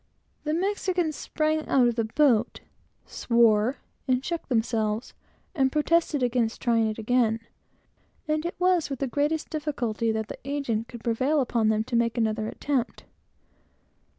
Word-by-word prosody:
The 305 +1 0 0.2
Spaniards 355 -6 -1
sprang 310 +1 -1
out 255 -3 +4
of 240 - +1
the 230 -1 -1
boat, 240 -1 +2 0.4
swore, 235 +1 +2 0.3
and 255 0 +1
shook 340 -2 -3
themselves 225 -2 -1 0.4
and 265 -6 +2
protested 305 -2 +1
against 240 -2 0
trying 230 -2 +2
it 215 - -5
again; 225 0 +1 0.9
and 305 0 0
it 345 - -4
was 360 -3 +2
with 275 - -3
the 275 - -1
greatest 295 +5 -1
difficulty 245 -8 -1
that 220 -1 -2
the - - -8
agent 265 -5 -2
could 235 -2 -10
prevail 260 +6 +1
upon 235 -4 +1
them 220 0 +1
to 235 - -4
make 230 0 +1
another 220 -1 0
attempt. 260 0 -2
245 Hz, 150 wpm, -26 LUFS, 225-300 Hz, 0.9 s, out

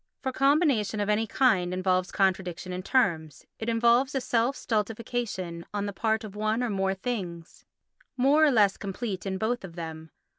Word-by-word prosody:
For 260 - -1
combination 275 - +2
of 205 0 -1
any 215 +1 +1
kind 195 -9 +2
involves 185 -1 0
contradiction 185 -1 -1
in 180 - -4
terms; 170 - 0
it 225 - -3
involves 235 +4 +3
a - - +2
self 245 +2 +1
stultification 215 -6 -3
on 205 0 -1
the 205 - -4
part 220 +2 0
of 210 -2 -9
one 215 +3 0
or 240 - -1
more 195 -1 0
things, 185 -6 -5 0.5
more 280 +5 +4
or 310 - +6
less 210 -7 +3
complete 200 -1 -4
in 190 0 -2
both 230 +4 -1
of 175 -3 -9
them. 160 -1 -7
210 Hz, 175 wpm, -27 LUFS, 185-240 Hz, 0.5 s, or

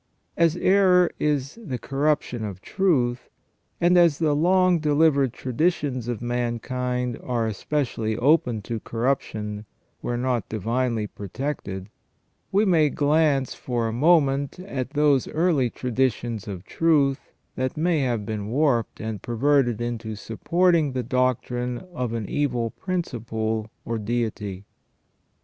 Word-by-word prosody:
As 165 -1 +3
error 185 -2 +4
is 145 - -1
the 135 - -4
corruption 135 -3 -1
of 100 -3 -5
truth, 125 - 0 0.5
and 175 +1 +4
as 170 -5 +4
the 155 -3 +2
long 180 +2 +3
delivered 150 -3 +3
traditions 130 -1 -1
of 120 -1 -3
mankind 125 +1 -2
are 120 -3 -1
especially 110 -1 -2
open 125 -5 +2
to 115 +1 -4
corruption, 110 -3 -2 0.3
where 120 - -3
not 125 -2 -1
divinely 115 +1 -1
protected, 100 -2 -5 0.6
we 200 +2 +3
may 160 -6 +4
glance 145 -2 +2
for 120 -2 -2
a 110 - -3
moment 140 0 +3
at 135 -10 -4
those 145 -2 +2
early 155 -6 +1
traditions 120 -3 -1
of 95 -3 -6
truth 145 -4 +1 0.2
that 130 +2 -2
may 165 0 +2
have 120 -6 -1
been 105 -1 -4
warped 125 -2 +1
and 110 -3 -4
perverted 120 0 +2
into 115 -2 -4
supporting 160 - +1
the 130 -1 -1
doctrine 125 -1 0 0.2
of 125 -7 -2
an 110 -3 -3
evil 125 -6 -1
principle 110 - -3 0.2
or 115 -1 -2
deity. 105 -3 -3
125 Hz, 125 wpm, -24 LUFS, 115-150 Hz, 0.6 s, error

